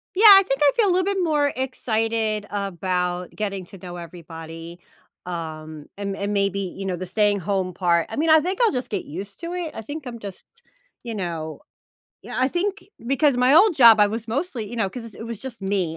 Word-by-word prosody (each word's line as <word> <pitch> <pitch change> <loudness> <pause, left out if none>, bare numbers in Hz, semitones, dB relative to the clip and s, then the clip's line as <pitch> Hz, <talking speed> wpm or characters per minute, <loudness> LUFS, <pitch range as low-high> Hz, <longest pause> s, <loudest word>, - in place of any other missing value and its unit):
Yeah, 415 +4 +3
I 395 -2 +11
think 270 +1 -1
I 285 -1 +6
feel 435 -4 +4
a - - +3
little 370 +1 +2
bit - - -2
more 295 -4 +2
excited 225 -4 -1
about 180 -2 -2
getting 195 -3 -3
to 195 - -13
know 175 0 -8
everybody, 165 0 -9 0.5
um, 155 -3 -6
and 200 -1 -3
and 200 +1 -2
maybe, 200 -1 +1
you 195 +1 -5
know, 185 -2 -1
the 185 +1 -6
staying 205 +1 +1
home 185 -1 -1
part, 170 -2 +2
I - - -5
mean, 320 +2 +1
I 315 0 +7
think 365 +5 -2
I'll 460 - +4
just 250 -1 -2
get 200 -4 -2
used 195 +6 -7
to 340 +1 -5
it; 350 -3 -4
I - - -6
think 290 +4 -7
I'm 235 -1 -6
just, 200 -4 -9 0.6
you 235 -2 -5
know 165 -5 -4 0.6
you - - -11
know, - - -4
I 260 - +3
think 390 +5 -2 0.2
because 275 0 +3
my 250 +3 +4
old 370 +1 +6
job, 230 -4 +8
I 205 - +6
was 225 +2 -4
mostly, 250 - -3
you 240 - -7
know 200 -4 0
'cause 230 -1 -9
it 225 - -8
was 230 -3 -6
just 245 -5 -8
me 190 -4 -1
210 Hz, 220 wpm, -23 LUFS, 180-265 Hz, 0.6 s, I